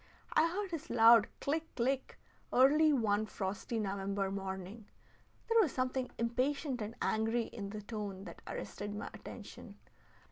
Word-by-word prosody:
I 315 +2 +5
heard 395 +1 -3
his 330 -1 -5
loud 230 -1 +7
click, 320 +3 -2
click, 265 +2 -1 0.3
early 300 +5 +6
one 215 -5 +2
frosty 200 +4 -3
November 195 -1 -1
morning. 195 +2 -5 0.6
There 460 0 +4
was 335 -10 +1
something 255 0 -1
impatient 255 +3 0
and 215 +3 -4
angry 225 +2 +1
in 200 -3 -6
the 210 0 -6
tone 205 -3 -5
that - - -10
arrested 205 0 -5
my 205 - -5
attention. - - -10
230 Hz, 140 wpm, -34 LUFS, 205-270 Hz, 0.6 s, loud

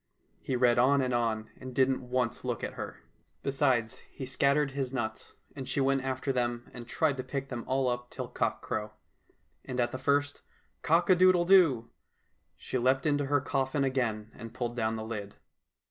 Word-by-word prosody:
He 130 - -2
read 120 -1 +4
on 140 +3 +5
and 125 -1 -1
on, 110 -2 -1
and 130 -1 -9
didn't 130 -1 +1
once 125 -2 -1
look - - -3
at - - -3
her. - - -7 0.4
Besides, 130 -5 +1
he 135 - -7
scattered 140 +2 +2
his 135 -2 -3
nuts, 110 -4 -4 0.2
and 130 -2 -6
she 135 - 0
went 135 0 +2
after 135 +1 -1
them 120 -1 -1
and 120 -1 -8
tried 145 +1 +1
to 130 - -3
pick 135 +1 -4
them 120 -2 -4
all 130 0 +1
up 125 0 -2
till - - -5
cockcrow. 110 0 -2 0.7
And 125 -1 -5
at 120 - +1
the 130 - -5
first 145 +1 +1 0.2
" - - -42
Cock 170 +4 +3
a - - +8
doodle 180 -1 +5
doo! 165 -11 +5 0.3
" - - -45
she 130 - -3
leaped 130 +3 +2
into 145 -2 +1
her 145 -1 +2
coffin 135 0 0
again 115 -5 -1
and 115 -1 -10
pulled 120 -1 -3
down 110 -2 0
the 110 0 -5
lid. 105 -3 -6
130 Hz, 190 wpm, -30 LUFS, 120-140 Hz, 0.7 s, a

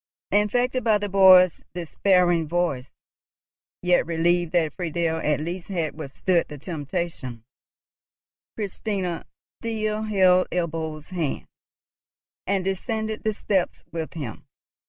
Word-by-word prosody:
Infected 245 +5 +2
by 220 -2 +4
the 205 0 -3
boy's 185 -2 +7
despairing 175 -1 +2
voice, 155 -6 -1 0.9
yet 180 0 +4
relieved 170 0 +1
that 160 -4 +2
Friedel 170 -2 -1
at 150 -2 0
least 170 +3 -5
had 170 -6 -2
withstood 165 +4 0
the 150 - -8
temptation, 145 - -5 1.1
Christina 195 -4 -3 0.3
still 215 -2 -2
held 185 -4 +4
Ebbo's 160 -3 -3
hand, 170 -6 -2 1.0
and 195 -1 +1
descended 220 +3 -2
the 220 - +1
steps 190 -4 -1
with 165 -1 -4
him. 135 -10 -7
175 Hz, 110 wpm, -24 LUFS, 160-195 Hz, 1.1 s, boy's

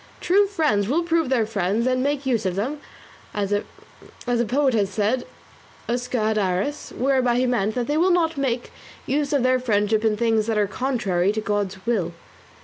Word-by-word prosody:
True 400 +3 +3
friends 305 - +1
will 315 +8 +1
prove 330 -4 +1
their 245 -4 +2
friends 210 +1 -1
and 255 0 +1
make 285 0 -1
use 240 -5 +1
of 180 - -2
them, 260 +10 -2 0.6
as 205 -1 -1
a 235 +3 -4
poet 265 +2 +2
has 205 -4 +1
said, 215 +5 -1 0.6
usque 245 +1 -2
ad 215 -2 +1
aras; 195 +10 -2
whereby 255 -2 +2
he 250 +1 +2
meant 225 -4 0
that 245 -1 -1
they 295 +4 0
will 355 +4 +3
not 335 -2 +2
make 255 -4 -2 0.3
use 285 +1 0
of 280 -4 +2
their 255 0 +3
friendship 215 -2 +1
in 215 -1 +2
things 225 -1 +1
that 225 -2 0
are 210 - +3
contrary 200 -5 0
to 220 - -2
God's 200 -2 -2
will. 195 -8 0
240 Hz, 185 wpm, -23 LUFS, 210-270 Hz, 0.6 s, True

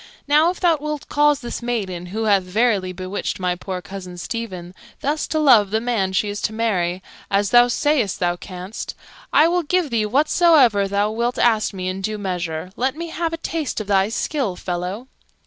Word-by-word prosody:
"Now, 300 +3 +5
if 360 - -4
thou 340 -3 +3
wilt 300 -1 -4
cause 295 -1 +3
this 240 0 -5
maiden 195 -8 -3
(who 215 +5 -3
hath 205 -3 +4
verily 195 0 +1
bewitched 185 +2 -4
my 180 -1 0
poor 180 0 -6
cousin 185 -2 -8
Stephen) 185 -3 -5 0.3
thus 295 +3 -1
to 315 - -2
love 245 -10 +5
the 220 +2 +1
man 225 -5 0
she 190 +3 +1
is 205 0 -4
to 220 - -1
marry, 185 -5 -1 0.3
as 200 0 +1
thou 240 0 +7
sayst 245 -5 +1
thou 175 -1 +1
canst, 185 +3 -7 0.4
I 310 - +6
will 355 +1 +1
give 340 -2 0
thee 220 -2 +1
whatsoever 275 - +4
thou 200 +2 0
wilt 235 +2 -1
ask 225 -3 +2
me 185 -2 -5
in 185 +1 -3
due 215 +2 -2
measure. 180 -3 -4
Let 260 +2 0
me 335 +1 -5
have 330 0 -2
a 330 - -3
taste 320 -5 -3
of 215 - -4
thy 195 0 +2
skill, 235 -4 -2
fellow." 180 +6 -4
215 Hz, 195 wpm, -21 LUFS, 185-275 Hz, 0.4 s, thou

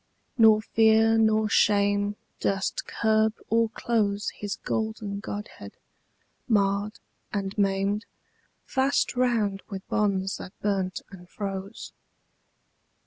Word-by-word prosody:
Nor 220 -2 +6
fear 225 +1 +4
nor 220 -1 +3
shame 205 0 +2 0.2
durst 195 -1 -1
curb 220 0 +1 0.2
or 230 0 +3
close 210 -3 -1
His 205 -1 -5
golden 220 -2 -3
godhead, 205 - -7 0.7
marred 205 -1 +1 0.3
and 195 -1 -3
maimed, 200 +1 0 0.6
Fast 265 0 +1
round 225 -6 +1
with 195 -2 -7
bonds 195 -2 0
that 185 - -11
burnt 190 -3 -1
and 180 -2 -13
froze. 195 -1 -6
205 Hz, 100 wpm, -26 LUFS, 195-220 Hz, 0.7 s, Nor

